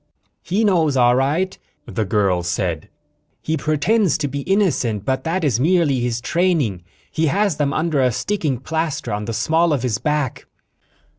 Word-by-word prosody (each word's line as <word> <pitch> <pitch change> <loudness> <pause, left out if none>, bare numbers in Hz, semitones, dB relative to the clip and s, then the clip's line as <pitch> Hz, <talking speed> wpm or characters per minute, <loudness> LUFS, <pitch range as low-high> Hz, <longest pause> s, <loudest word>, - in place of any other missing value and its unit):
"He 195 +6 0
knows, 165 -9 +2
all 120 -1 +5
right," 155 +9 0 0.3
the 110 - -2
girl 95 -3 +1
said. 85 -2 -2 0.5
"He 160 - -1
pretends 160 +7 +1
to 150 - -2
be 140 +1 -4
innocent, 140 - 0
but 130 0 -1
that 170 +2 -1
is 130 -7 +1
merely 155 -3 +2
his 120 -1 -2
training. 155 - 0 0.3
He 160 0 0
has 195 +1 +1
them 145 -2 0
under 155 -1 0
a 125 -1 +3
sticking 155 - -1
plaster 160 0 -3
on 105 0 -3
the 115 - -4
small 160 +9 +2
of 135 -4 -1
his 120 -5 -1
back." 150 -4 -2
145 Hz, 165 wpm, -20 LUFS, 120-170 Hz, 0.5 s, all